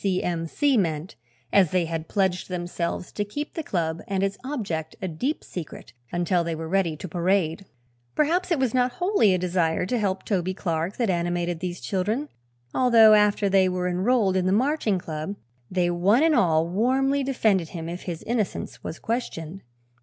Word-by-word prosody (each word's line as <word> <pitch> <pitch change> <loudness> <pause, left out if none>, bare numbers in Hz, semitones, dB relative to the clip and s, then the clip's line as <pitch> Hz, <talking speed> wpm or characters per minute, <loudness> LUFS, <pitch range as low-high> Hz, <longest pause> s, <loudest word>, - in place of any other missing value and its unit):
C. 190 -2 +1
M. 165 -2 -2
C." 280 - +2
meant, 165 -3 -1 0.4
as 190 -5 +5
they 180 0 +1
had 160 0 -4
pledged 190 -2 0
themselves 175 -1 -3
to 205 - -2
keep 290 +9 -5
the 325 - -3
club 165 - -2
and 195 -1 0
its 195 0 0
object 200 - -4
a 190 - -3
deep 245 - -2
secret 160 -8 -8 0.2
until 175 0 +1
they 165 -1 -2
were 160 0 -5
ready 170 -3 +1
to 185 - -6
parade. 180 0 0 0.5
Perhaps 345 +5 +1
it 340 - +2
was 260 -4 0
not 250 -1 +2
wholly 355 - +3
a - - +1
desire 175 -2 0
to 240 +6 -1
help 195 -2 -1
Toby 185 -2 -1
Clark 170 0 -2
that 230 -6 +1
animated 175 -1 -1
these 175 -1 -4
children, 210 - -2 0.4
although 230 -4 +6
after 210 -1 +4
they 190 -1 +4
were 180 0 -1
enrolled 190 +2 +2
in 185 -1 +1
the - - +2
Marching 235 -2 +1
Club 160 +2 -5 0.3
they 180 -1 +1
one 195 - +3
and 325 -1 +4
all 165 - +3
warmly 260 +9 +1
defended 215 - +1
him 165 -2 -6
if 175 +2 -5
his 170 -3 -5
innocence 225 -4 -3
was 160 - -5
questioned. 195 -7 -4
185 Hz, 185 wpm, -25 LUFS, 170-225 Hz, 0.5 s, although